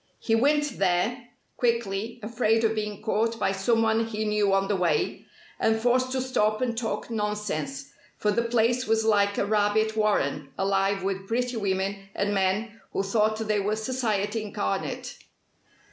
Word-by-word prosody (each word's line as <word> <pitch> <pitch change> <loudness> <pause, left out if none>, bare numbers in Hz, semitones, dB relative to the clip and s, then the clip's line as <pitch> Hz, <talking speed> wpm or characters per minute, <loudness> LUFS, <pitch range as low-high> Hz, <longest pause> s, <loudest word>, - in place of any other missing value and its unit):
He 225 - -1
went 295 +5 +2
there 200 +7 +1 0.3
quickly, 235 -2 -1
afraid 225 0 +1
of 220 0 +3
being 210 -1 -4
caught 225 +1 0
by 195 - +1
someone 225 +2 +2
he 215 -1 -3
knew 210 -1 +2
on 195 0 +2
the 205 - +1
way, 180 -3 0 0.3
and 220 0 +2
forced 255 +2 +2
to 260 - 0
stop 215 -4 +1
and 245 -2 -1
talk 230 0 -3
nonsense, 155 -11 -3 0.3
for 210 - +1
the 235 - +1
place 235 +2 +1
was 220 0 +2
like 200 -2 +3
a - - +1
rabbit 215 +1 +2
warren 150 -10 0
alive 195 0 +1
with 195 0 -3
pretty 245 +2 -1
women 195 -1 -2
and 205 +1 0
men 205 +4 0
who 195 - 0
thought 215 +2 +1
they 215 -1 +2
were 205 +2 0
Society 220 -2 -1
incarnate. 200 - -3
215 Hz, 160 wpm, -26 LUFS, 195-230 Hz, 0.3 s, of